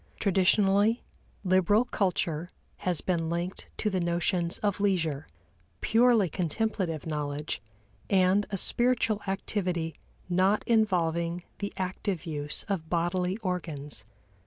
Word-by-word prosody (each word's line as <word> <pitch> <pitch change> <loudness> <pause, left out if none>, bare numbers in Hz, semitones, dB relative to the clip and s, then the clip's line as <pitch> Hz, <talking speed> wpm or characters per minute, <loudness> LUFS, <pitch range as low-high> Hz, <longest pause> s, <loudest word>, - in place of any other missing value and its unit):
Traditionally, 200 +3 +3 0.4
liberal 190 +4 +4
culture 175 -6 -1 0.3
has 180 -4 0
been 165 -3 0
linked 170 +2 -3
to - - -1
the 190 -3 +1
notions 170 +1 0
of 205 -2 +1
leisure, 165 -8 0 0.5
purely 230 -3 +4
contemplative 180 -1 -2
knowledge 150 -5 -3 0.5
and 190 +1 +3
a 200 - -2
spiritual 235 0 +2
activity 180 -4 -1 0.3
not 185 +4 +2
involving 175 -6 +1 0.2
the 200 0 -3
active 185 -1 -2
use 150 -3 -3
of 185 -6 -3
bodily 180 +2 0
organs. 155 - -3
185 Hz, 110 wpm, -29 LUFS, 165-200 Hz, 0.5 s, liberal